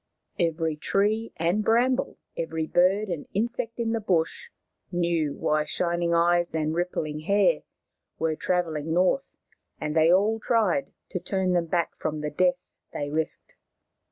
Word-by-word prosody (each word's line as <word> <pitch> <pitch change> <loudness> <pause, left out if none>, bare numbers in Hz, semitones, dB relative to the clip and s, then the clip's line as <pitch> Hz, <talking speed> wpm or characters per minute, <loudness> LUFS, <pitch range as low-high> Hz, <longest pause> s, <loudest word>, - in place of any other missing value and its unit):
Every 165 -2 0
tree 210 +7 0
and 175 +6 +1
bramble, 245 +4 +2 0.2
every 160 -1 -2
bird 190 +6 +3
and 170 -5 -4
insect 230 +2 -2
in 230 -1 -1
the 230 - 0
bush, 185 - 0 0.4
knew 170 -4 0
why 155 0 +1
Shining 170 +1 -1
Eyes 175 0 +2
and 155 0 0
Rippling 160 -3 -2
Hair 200 - +3 0.6
were 160 -1 0
trav 180 +2 +1
elling 160 0 -3
north, 185 +10 +1 0.4
and 150 0 -3
they 160 +1 +5
all 210 +5 +3
tried 210 - +1 0.2
to 180 - -3
turn 190 0 0
them 170 -1 +1
back 170 0 0
from 155 -1 -3
the 150 0 -3
death 180 +2 +1 0.3
they 145 0 -4
risked. 160 +1 -3
175 Hz, 150 wpm, -26 LUFS, 160-200 Hz, 0.6 s, they